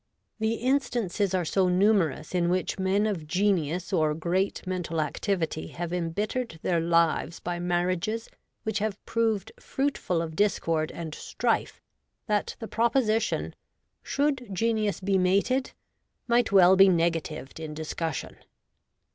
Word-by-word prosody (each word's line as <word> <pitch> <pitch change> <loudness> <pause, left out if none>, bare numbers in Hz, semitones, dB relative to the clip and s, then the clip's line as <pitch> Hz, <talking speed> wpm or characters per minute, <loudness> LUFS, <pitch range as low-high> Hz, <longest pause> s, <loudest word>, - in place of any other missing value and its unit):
The 220 +1 +1
instances 230 -7 0
are 180 -2 0
so 185 +3 +2
numerous 185 -5 +2
in 175 -1 +2
which 185 +2 -1
men 190 +2 +2
of 185 -8 -2
genius 180 -1 0
or 155 -4 +2
great 180 +5 -1
mental 180 -3 -2
activity 160 - -1
have 170 - -5
embittered 200 +5 -2
their 170 -2 +2
lives 165 -1 +1
by 175 0 -4
marriages 180 +5 -1 0.4
which 220 0 -1
have 210 -1 -2
proved 225 -3 0
fruitful 270 - -1
of 160 -1 -6
discord 165 -6 +1
and 165 -2 -6
strife, - - -1 0.5
that 210 -4 -1
the 225 - -7
proposition, 230 0 +1 0.3
' - - -52
Should 275 -5 0
Genius 215 0 0
be 195 0 +2
mated? 200 +9 +1 0.3
' - - -50
might 240 -1 +3
well 190 -1 +7
be 195 0 +7
negatived 165 -4 -1
in 155 -1 -6
discussion. 160 +1 -4
185 Hz, 135 wpm, -27 LUFS, 170-215 Hz, 0.5 s, well